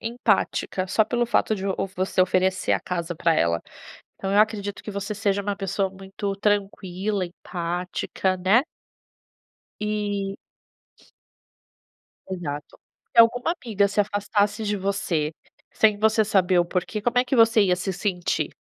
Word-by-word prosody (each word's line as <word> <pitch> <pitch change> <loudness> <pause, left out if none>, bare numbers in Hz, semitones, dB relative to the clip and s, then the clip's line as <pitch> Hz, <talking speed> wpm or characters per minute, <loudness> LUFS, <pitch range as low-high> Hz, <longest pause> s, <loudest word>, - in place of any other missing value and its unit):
empática, 225 -4 0
só 220 +3 +3
pelo 240 +1 0
fato 225 -2 +2
de 195 +1 -4
o 195 - 0 0.2
você 185 0 0
oferecer 185 +1 +2
a - - +3
casa 175 -1 -3
pra 165 -1 +2
ela, 85 - +1 0.6
então 195 - -4
eu 205 - +4
acredito 205 -2 0
que 210 - -6
você 200 +1 -4
seja 200 -2 0
uma 200 0 -2
pessoa 195 0 -1
muito 195 +1 -5
tranquila, 200 -1 -1
empática, 180 +1 -3
né? 195 +7 +4 1.2
E 205 -2 -2 1.9
Exato. 150 -6 -6 0.3
Se 235 - +5
alguma 245 +8 +2
amiga 215 - 0
se 205 - -2
afastasse 205 +1 0
de 210 0 0
você, 185 -6 -1 0.4
sem 215 -2 +3
você 220 0 +3
saber 185 -3 +3
o 175 - +3
porquê, 185 +4 -2
como 240 +3 0
é 250 - +3
que 260 +1 -1
você 225 -1 +5
ia 185 -2 +3
se 185 +1 -3
sentir? 180 -3 -2
200 Hz, 145 wpm, -24 LUFS, 185-215 Hz, 1.9 s, Se